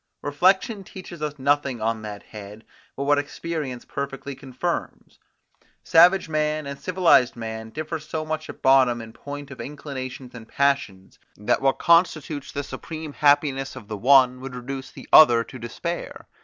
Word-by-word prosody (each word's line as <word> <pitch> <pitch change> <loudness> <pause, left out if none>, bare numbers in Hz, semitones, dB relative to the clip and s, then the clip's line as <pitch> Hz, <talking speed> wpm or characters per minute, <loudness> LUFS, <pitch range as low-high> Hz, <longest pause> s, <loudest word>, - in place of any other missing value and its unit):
Reflection 190 +8 +2
teaches 180 -3 -10
us 150 -1 -3
nothing 140 -2 +1
on 110 0 -1
that 105 -1 -8
head, 105 +1 -11 0.3
but 140 - -3
what 145 +1 +3
experience 145 -3 -5
perfectly 140 0 -5
confirms. 130 -1 -5 0.6
Savage 180 +3 +5
man 155 -1 -1
and 140 0 -6
civilised 180 -9 +3
man 110 -1 -6
differ 155 +5 -5
so 155 +1 -5
much 155 0 -4
at - - -10
bottom 130 -3 +5
in 110 -1 -10
point 145 +3 -8
of 135 - -8
inclinations 130 -3 -7
and 115 -2 -11
passions, 140 -10 -1 0.2
that 115 +5 0
what 135 0 +2
constitutes 160 -4 +2
the 145 - -3
supreme 155 +3 -7
happiness 145 -2 +2
of 105 - -10
the 110 - -5
one 130 +2 +5
would 130 -1 -7
reduce 130 +2 -6
the - - -13
other 120 -7 +8
to 130 - -11
despair. 170 +9 -6
140 Hz, 155 wpm, -24 LUFS, 125-155 Hz, 0.6 s, other